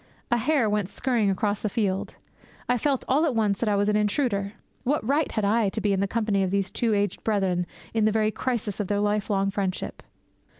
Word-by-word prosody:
A 240 - +4
hare 255 0 +2
went 205 -2 0
scurrying 235 -5 0
across 205 +2 0
the 215 - -1
field. 195 -3 -1 0.5
I 245 - +3
felt 275 +1 0
all 280 +5 +3
at 295 -7 +1
once 210 -3 +1
that 230 - 0
I 205 - +2
was 200 0 +2
an 210 - +2
intruder. 210 -1 0 0.3
What 265 -4 0
right 285 +2 +1
had 215 -3 0
I 215 0 +3
to 220 - -4
be 205 -1 +1
in 190 - 0
the 200 - +1
company 210 -2 0
of 190 - +1
these 195 0 0
two 225 -3 +1
aged 205 0 -1
brethren 190 -5 0 0.3
in 220 -1 +2
the 215 - +4
very 215 0 +2
crisis 225 -5 -2
of 205 - -1
their 205 +1 0
lifelong 205 -1 +1
friendship? 190 -2 -3
210 Hz, 220 wpm, -26 LUFS, 200-230 Hz, 0.5 s, A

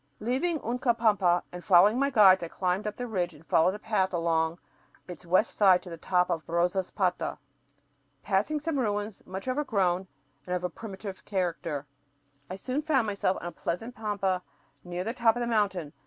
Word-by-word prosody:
Leaving 270 +9 0
Uncapampa 225 -7 +2
and 180 0 -8
following 205 +5 +5
my 280 0 +2
guides, 195 -7 +6
I 170 - -3
climbed 185 +4 -1
up 210 - -4
the 245 - -4
ridge 180 -7 -2
and 155 +2 -17
followed 180 +5 +3
a - - -5
path 210 -3 0
along 165 -1 +1 0.5
its 180 -1 -10
west 185 +6 +2
side 190 -3 +5
to 180 - -10
the - - -5
top 180 +2 +1
of 165 -2 -1
Rosaspata. 175 +2 0 0.9
Passing 215 +10 0
some 295 -1 -2
ruins 205 -3 -2
much 190 +5 -6
overgrown 195 -9 0 0.4
and 180 - -1
of 180 - -3
a 180 - -2
primitive 195 -2 -8
character, 170 -6 -2 0.6
I 185 - -4
soon 255 +9 -3
found 290 -6 +2
myself 200 -2 0
on - - -8
a 175 - -4
pleasant 225 +11 -4
pampa 200 -5 -1 0.4
near 175 0 -4
the 225 +4 -3
top 235 -3 +3
of - - -3
the 240 - -1
mountain. 195 -9 0
195 Hz, 180 wpm, -28 LUFS, 180-225 Hz, 0.9 s, guides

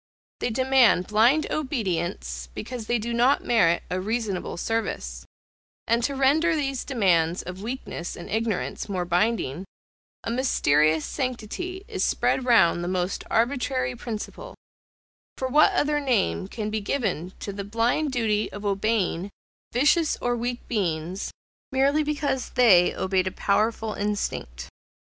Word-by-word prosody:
They - - -1
demand 255 -5 +4
blind 235 +10 +3
obedience, 175 - -2
because 240 -4 -6
they 240 - +2
do 235 +2 -3
not 245 +4 +3
merit 170 -8 +3
a 185 +1 -1
reasonable 210 -4 -2
service: 65 - -3 0.6
and 235 +1 +2
to 275 +3 0
render 305 +5 +3
these 275 -4 -2
demands 180 - +1
of 180 +1 -7
weakness 225 -6 -5
and 170 - -9
ignorance 220 -2 -2
more 185 -3 -1
binding, 180 - 0 0.6
a - - -3
mysterious 155 - +2
sanctity 275 - -4
is - - -2
spread 260 - +1
round 175 -8 +4
the - - -3
most 185 +1 -1
arbitrary 250 +1 0
principle; 225 -3 -7 0.8
for 260 - -2
what 300 +8 +5
other 295 -4 +1
name 95 - 0
can 215 - -4
be 215 0 -1
given 200 - -2
to 200 - -5
the 200 0 -5
blind 230 +8 0
duty 220 -4 0
of 205 +1 -8
obeying 200 -2 0 0.4
vicious 295 +6 +3
or 245 0 0
weak 240 +1 -4
beings, 180 -3 -2 0.4
merely 275 +3 +3
because 290 -3 -1
they 195 -8 +5
obeyed 190 0 0
a - - -1
powerful 215 +3 0
instinct? 200 - -3
225 Hz, 135 wpm, -25 LUFS, 185-255 Hz, 0.8 s, what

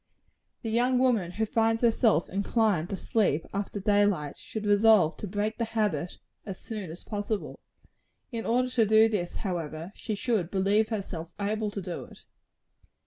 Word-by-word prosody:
The 225 - -2
young 250 +3 +2
woman 230 -9 +2
who 220 +3 0
finds 225 +1 +1
herself 225 -7 +3
inclined 200 -3 +1
to - - -2
sleep 190 -7 0
after 200 +1 -3
day 205 0 +3
light, 170 -8 0
should 215 -1 -7
resolve 205 -5 +5
to 210 - -5
break 210 +4 -2
the - - +1
habit 210 -8 -1 0.3
as 195 -3 -6
soon 210 -6 -6
as 165 +3 -8
possible. 205 0 -4 0.7
In 230 -2 -3
order 250 +2 +1
to 235 -3 +3
do 220 +1 +6
this, 195 -6 -2
however, 165 -2 -4
she 215 - -4
should 205 -6 0
believe 200 +3 +2
herself 190 -7 -4
able 210 +1 -1
to 205 -2 -5
do 175 -1 -5
it. - - -16
205 Hz, 165 wpm, -28 LUFS, 185-225 Hz, 0.7 s, do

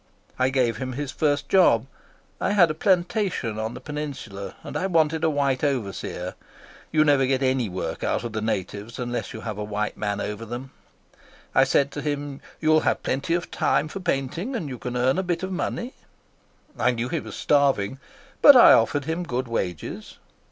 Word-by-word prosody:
I 130 0 +3
gave 125 -4 +1
him 130 +1 -4
his 145 +1 -4
first 145 -2 0
job. 130 -11 +4 0.5
I 205 - 0
had 175 -6 +5
a - - -2
plantation 180 - 0
on 110 +2 -3
the - - -7
peninsula, 135 -10 -6
and - - -8
I 190 - 0
wanted 160 -3 +2
a 160 - +4
white 140 -3 0
overseer. 100 -9 -2 0.6
You 155 -1 +4
never 140 -3 +4
get 135 0 +1
any 130 -4 +1
work 90 0 -4
out - - 0
of 120 -2 -5
the 110 - -2
natives 105 +1 -3
unless 120 -1 -3
you - - -7
have 105 -3 -5
a - - -2
white 105 0 -3
man 105 -1 -2
over 105 +2 -4
them. 120 +4 -7 0.8
I 135 - +5
said 140 +1 +2
to 145 - -5
him: 145 -1 -3 0.2
'You'll 155 0 +4
have - - 0
plenty 140 +6 0
of 175 - -4
time 150 - +1
for 195 - -6
painting, 170 - -2
and 175 -10 -3
you 125 -3 -7
can 125 0 -4
earn 130 +7 +2
a - - +2
bit 175 -1 -2
of 190 - -3
money.' 240 +7 -3 0.9
I - - +3
knew 120 -1 -1
he 165 0 -1
was - - -8
starving, 135 -5 +2 0.4
but 285 - +10
I 250 - +9
offered 135 +5 +2
him 160 +3 -2
good 130 -6 -3
wages." 90 -8 -4
135 Hz, 195 wpm, -24 LUFS, 115-155 Hz, 0.9 s, but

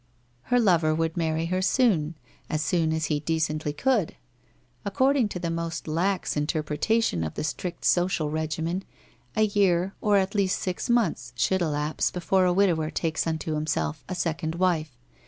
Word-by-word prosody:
Her 245 0 +3
lover 170 -8 +3
would 165 0 -1
marry 160 -1 0
her 185 - +1
soon, 185 - +2 0.3
as 155 0 -1
soon 165 -2 +1
as 160 0 0
he 150 -1 0
decently 155 -1 -1
could. 215 - 0 0.7
According 260 +3 +2
to 185 - -5
the 170 -2 -2
most 165 -1 -4
lax 180 +5 0
interpretation 155 - 0
of 80 -1 -4
the - - -3
strict 170 +3 -4
social 175 -4 +2
regimen, 160 +4 -2 0.5
a 215 - +3
year, 195 -3 +2
or 205 -1 +4
at 190 0 0
least 200 -2 +1
six 185 +5 -3
months, 170 - +1
should 190 +10 +1
elapse 150 -2 0
before 185 +1 +1
a 180 - +3
widower 175 -5 +2
takes 160 0 -1
unto 160 -1 -2
himself 150 -1 -2
a 185 - -2
second 165 -1 -2
wife. 165 -7 0
165 Hz, 160 wpm, -26 LUFS, 155-190 Hz, 0.7 s, or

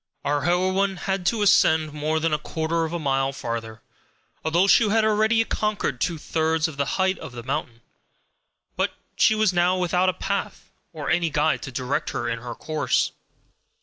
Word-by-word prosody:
Our 145 0 0
heroine 185 +2 +1
had 190 -1 -2
to 220 0 +1
ascend 160 -6 +4
more 155 +1 -1
than 160 0 0
a 150 - +1
quarter 160 +2 -2
of 160 - -5
a 170 - -2
mile 135 -3 0
farther, 115 -3 -6 0.6
although 170 +4 +3
she 210 +2 +5
had 220 +1 +3
already 220 +1 +3
conquered 210 - -2
two 170 -2 0
thirds 160 +1 0
of 160 - -8
the 140 0 0
height 190 0 +1
of 125 - -9
the 120 -1 -7
mountain. 115 -1 -4 0.9
But - - -1 0.2
she 220 - +4
was 215 -3 +2
now 180 +1 +2
without 180 +1 +2
a - - 0
path 200 +2 -4 0.2
or 155 -4 -4
any 170 -1 +2
guide 150 +1 +1
to 135 - -7
direct 130 +2 -2
her 120 -1 -2
in 115 0 -2
her 120 0 -7
course. 155 -3 0
160 Hz, 180 wpm, -24 LUFS, 140-190 Hz, 0.9 s, she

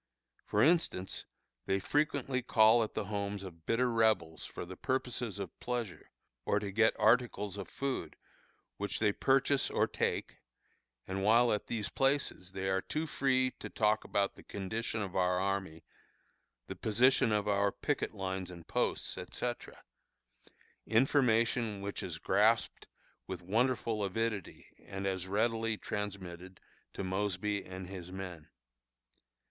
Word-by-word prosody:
For 105 +1 +3
instance, 155 - +1 0.4
they 95 - +2
frequently 140 - 0
call 110 0 +5
at 110 - -6
the - - -1
homes 100 0 -3
of 85 -4 -11
bitter 125 +2 +2
Rebels 110 -8 +2
for - - -6
the 95 +2 -8
purposes 125 -4 -2
of 95 -4 -7
pleasure, 120 -6 -4 0.3
or 105 - +1
to 100 -1 -2
get 110 +3 +4
articles 110 -3 +3
of 100 -2 -6
food, 135 -1 -3 0.6
which 100 0 -2
they 105 -2 +3
purchase 135 +4 +2
or - - +2
take, - - -2 0.7
and 95 +1 -2
while 115 +3 +5
at 105 - -2
these 110 -3 -2
places 135 -9 0
they 95 0 -3
are 95 0 +1
too 155 +9 -2
free 130 -3 +2
to - - -6
talk 110 0 +2
about 100 -1 0
the - - -14
condition 110 +3 -3
of 95 -2 -6
our 90 -1 +2
army, 95 -4 -2 0.8
the - - -6
position 115 +2 +3
of 105 -1 +1
our 100 0 +2
picket 145 -6 -2
lines 95 -2 -3
and 85 -2 -11
posts, - - -1
etc. 120 -1 -5 1.0
information 115 -3 +3
which 100 +1 -4
is 85 -3 -4
grasped 105 +6 +2 0.4
with 90 -1 -5
wonderful 115 +1 +1
avidity 105 0 -2 0.2
and 95 0 -5
as 95 -1 -2
readily 110 +2 +1
transmitted 95 -3 -5 0.3
to - - -5
Mosby 100 +1 -1
and 95 0 -7
his 90 -2 -8
men. 90 -5 -7
105 Hz, 140 wpm, -33 LUFS, 95-115 Hz, 1.0 s, call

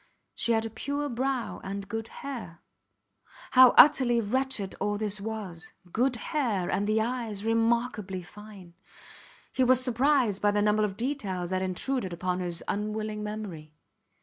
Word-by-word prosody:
She 235 - 0
had 225 0 +1
a 225 - -5
pure 285 +5 -3
brow 255 0 -2
and 195 0 -5
good 225 +2 -4
hair. 230 -14 -8 0.9
How 255 -1 +9
utterly 255 -4 +7
wretched 230 -2 -1
all 205 0 -1
this 210 -1 -2
was. 200 -6 -6 0.2
Good 250 +5 +1
hair 225 -7 -1
and 205 +1 0
fine 215 +1 +2
eyes 220 -3 -3
remarkably 225 -4 0
fine. 200 -2 -13 0.8
He 260 - +2
was 255 0 +5
surprised 250 -4 +2
by 205 - +4
the 205 0 +1
number 210 0 +3
of 200 -2 -2
details 200 -9 -3
that 185 0 0
intruded 190 +2 -2
upon 180 +1 -2
his 175 -2 0
unwilling 215 +1 -3
memory. 205 -8 -6
215 Hz, 150 wpm, -28 LUFS, 195-245 Hz, 0.9 s, How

